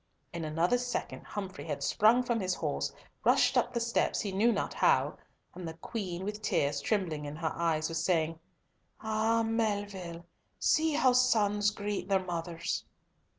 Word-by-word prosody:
In 170 -1 -4
another 165 +9 +1
second 245 0 -4
Humfrey 190 -3 -6
had 145 -3 -3
sprung 220 - +4
from 235 -2 0
his 185 -2 0
horse, - - -2 0.3
rushed - - +4
up - - +2
the 235 - -1
steps, 235 0 +1
he 205 - -2
knew 215 +5 +3
not - - -1
how, - - +2 0.3
and 180 -1 -7
the 160 - -6
Queen, 185 0 -5
with 210 +1 -4
tears 140 -8 +1
trembling 170 -6 -1
in 145 +1 -5
her 160 0 -2
eyes 160 -2 +1
was 165 -1 -2
saying, 165 -2 +1 0.6
"Ah, 220 +1 +1
Melville! 205 -6 -2 0.3
see 315 0 +2
how 265 -4 +4
sons 210 -5 +3
meet 205 -1 -2
their 190 -1 +2
mothers!" 170 -1 -3
195 Hz, 160 wpm, -31 LUFS, 165-225 Hz, 0.6 s, sprung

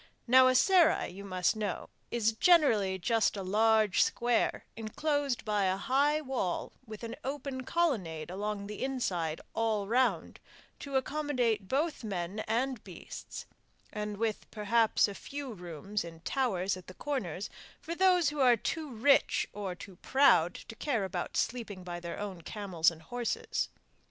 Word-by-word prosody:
Now 255 +1 +7
a 255 - +3
serai, 350 +2 +4
you 195 +3 -9
must 185 0 0
know, 210 -4 -3 0.2
is 225 -2 +2
generally 220 - +4
just 215 +4 +1
a 195 - -3
large 215 +1 +3
square 240 -1 +1
enclosed 280 +4 -1
by 210 -2 +1
a 185 0 +1
high 285 +7 +2
wall 255 - -2
with 215 +1 -9
an 230 0 -5
open 270 -1 -4
colonnade 190 - -1
along 205 +1 -3
the 210 0 -6
inside 180 -12 -1
all 220 -3 0
round 250 +4 +1 0.4
to 280 -1 -6
accommodate 260 -7 0
both 295 - -1
men 190 -1 -3
and 245 +1 -1
beasts, 185 -3 -9 0.5
and 210 -1 -4
with 220 -1 -2
perhaps 220 +1 +2
a 200 - -5
few 275 +4 -6
rooms 180 +2 -4
in 165 -1 -10
towers 200 -6 0
at 185 -1 -12
the 185 - -10
corners 205 - -3 0.3
for 335 - -5
those 360 -3 +4
who 295 0 -6
are 250 -3 +6
too 315 +7 -3
rich 260 +4 +3
or 195 -3 -4
too 180 +1 -11
proud 220 - +4
to 230 - -9
care 230 -4 -1
about 185 -2 -4
sleeping 220 -6 -2
by 175 -1 -5
their 170 -1 -6
own 195 -4 -5
camels 180 -2 +1
and 160 -1 -12
horses. 245 +4 -2
220 Hz, 155 wpm, -31 LUFS, 190-265 Hz, 0.5 s, Now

